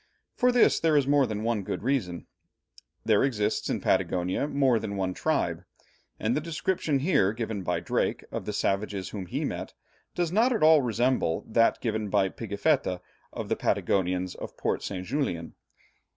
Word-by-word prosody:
For 250 0 +3
this 245 -1 +4
there 160 -2 +3
is 140 - +3
more 140 -1 +3
than 105 0 -4
one 115 -2 0
good 100 - -5
reason. 115 -10 -1 0.8
There 110 -2 +4
exists 115 -7 0
in - - -1
Patagonia 90 +6 0
more 135 -5 +2
than 105 -2 -4
one 95 -1 -1
tribe, - - -1 0.6
and 110 +3 0
the 150 - 0
description 165 -1 -1
here 135 - +2
given 110 -3 -3
by 90 - -1
Drake - - -1
of - - -4
the - - -2
savages 100 -1 -1
whom 95 -4 -6
he - - -2
met, - - -5 0.4
does 175 -2 0
not 230 +7 +3
at 220 - 0
all 155 -1 +7
resemble 120 -7 0
that 115 +1 +3
given 110 -3 -2
by 95 -1 +2
Pigafetta 100 -3 0 0.3
of - - -5
the - - 0
Patagonians 90 -1 0
of - - -9
Port - - -1
St. 95 -2 -5
Julian. 90 - -2
110 Hz, 170 wpm, -27 LUFS, 95-140 Hz, 0.8 s, all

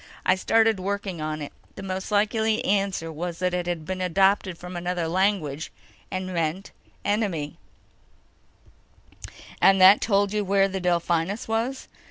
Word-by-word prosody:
I - - +5
started 220 +2 +2
working 195 -3 -3
on 155 0 -3
it. 145 - -8 0.2
The 195 - -8
most 190 0 -4
likely 220 +1 +1
answer 195 -4 0
was 170 +2 -5
that 180 0 -1
it 180 -1 -2
had 170 -3 -3
been 185 +2 -4
adopted 190 0 +2
from 180 +1 -9
another 175 -1 -2
language, 165 -5 0 0.4
and 185 0 -3
meant 170 +3 -2 0.3
enemy." 195 -9 -1 2.0
"And 195 0 +6
that 190 +2 +8
told 200 -1 +1
you 210 -1 0
where 195 0 +3
the 190 -1 -4
Delphinus 175 +4 0
was?" 230 +4 -2
190 Hz, 145 wpm, -25 LUFS, 175-200 Hz, 2.0 s, that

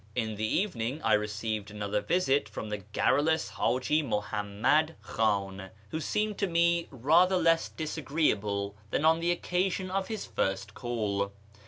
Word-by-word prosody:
In 110 -3 -1
the 110 +1 -1
evening 130 - -1
I 110 - +3
received 105 0 -1
another 105 0 -2
visit 145 -6 +1
from 110 - -6
the 105 -1 -3
garrulous 145 - +1
Haji 150 +5 +1
Muhammad 110 +6 0
Khan, 100 -3 -1 0.2
who 160 - -3
seemed 210 +6 -1
to 200 - +1
me 170 0 +2
rather 165 +9 +4
less 165 -1 +3
dis 160 0 -4
agreeable 105 -9 0
than 150 - 0
on 160 +1 +5
the 170 +1 0
occasion 185 +2 0
of 195 0 -1
his 220 -3 -4
first 95 +2 -2
call. 105 -5 -2
130 Hz, 150 wpm, -29 LUFS, 105-165 Hz, 0.2 s, on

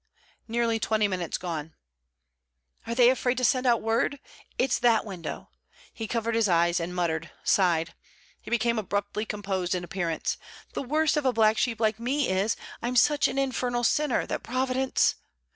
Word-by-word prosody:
'Nearly 230 0 0
twenty 215 -1 +1
minutes 180 -4 -2
gone.' 160 -3 -5 1.1
'Are 230 - -2
they 245 0 +6
afraid 255 -1 0
to 255 - +1
send 255 +2 +2
out 235 -2 +3
word? 230 +5 0 0.4
It's 255 0 +1
that 235 -2 +3
window!' 190 -5 -7 0.4
He 225 - -5
covered 230 0 -1
his 225 -3 +2
eyes, 170 0 +3
and 175 +2 -4
muttered, 165 -2 -1
sighed. 170 -4 +2 0.5
He - - -10
became 235 -1 +1
abruptly 205 +1 -2
composed 195 -4 -2
in 180 - -3
appearance. 175 -2 -2 0.4
'The - - -2
worst 305 +3 +1
of 295 - 0
a - - +4
black 220 -1 +3
sheep 235 -2 0
like 220 -1 +1
me 265 +4 0
is, 195 +4 +1 0.3
I'm 245 +1 -2
such 290 +4 +4
an - - -4
infernal 250 -3 0
sinner, 295 +2 +2
that - - -3
Providence!... 255 +1 +1
225 Hz, 165 wpm, -27 LUFS, 185-250 Hz, 1.1 s, they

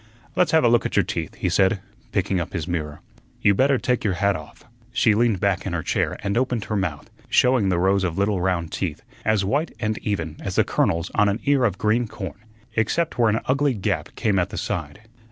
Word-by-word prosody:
"Let's 180 0 +3
have 160 - +4
a - - +5
look 120 0 +4
at - - -7
your - - +4
teeth," - - -4
he - - -2
said, 95 +3 +3 0.3
picking 95 -1 0
up 85 - -4
his 85 -3 -3
mirror. 75 -4 -3 0.4
"You 105 - +6
better 135 +6 +3
take 125 0 0
your 100 -4 +1
hat 100 +1 +2
off." 75 -1 -10 0.3
She 120 -3 +3
leaned 110 -2 +2
back 100 -1 +1
in 95 - -3
her 85 -2 -2
chair - - 0
and 100 0 -1
opened 125 -4 -1
her 105 - -2
mouth, 90 -7 -3 0.2
showing 125 -6 +3
the 90 - +1
rows 95 +2 +2
of 85 -3 -2
little 100 -1 +1
round 90 -3 0
teeth, 85 -6 -3 0.2
as 110 -3 +2
white 145 - 0
and 110 -1 -1
even 85 -7 -3
as - - -4
the - - +5
kernels 85 0 0
on 105 -1 +3
an 100 +3 -1
ear 140 -3 +3
of 100 -5 0
green 115 +3 +1
corn, 100 -1 -7 0.4
except 125 +7 0
where 115 -2 +5
an 110 +1 +1
ugly 140 0 +2
gap 100 - -2
came 105 -4 +1
at 90 - 0
the - - -7
side. 105 - -4
100 Hz, 225 wpm, -23 LUFS, 90-120 Hz, 0.4 s, You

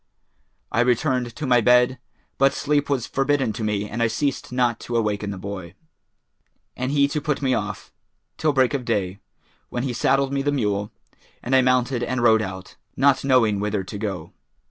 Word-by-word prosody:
I - - 0
returned 125 0 +1
to 150 - -4
my 125 -2 +4
bed, 125 +2 +4 0.4
but 135 +1 +4
sleep 145 0 0
was 130 -5 0
forbidden 135 -4 0
to 110 - -5
me 105 -1 -1
and 115 +3 -4
I 115 - +4
ceased 135 +4 -2
not 125 -2 +1
to 120 - -5
awaken 105 -2 -1
the 100 - -5
boy, 95 -2 -7 1.0
and 130 +1 -2
he 140 -1 +3
to 150 0 -2
put 145 -1 -2
me 130 -1 +2
off, - - -4 0.4
till 155 - +1
break 130 -1 +2
of 135 -3 -1
day, 100 -5 -2 0.5
when 120 - -3
he 130 -2 -2
saddled 135 +3 +1
me 140 - 0
the 145 +1 0
mule, 105 -6 -1 0.5
and 130 +2 +1
I 130 - +6
mounted 125 0 +1
and 120 0 -1
rode 110 -2 +5
out, 95 -2 -7 0.2
not 135 0 +3
knowing 120 -7 +3
whither 105 -1 -1
to 100 +2 -7
go. 95 -6 -5
125 Hz, 190 wpm, -23 LUFS, 105-135 Hz, 1.0 s, I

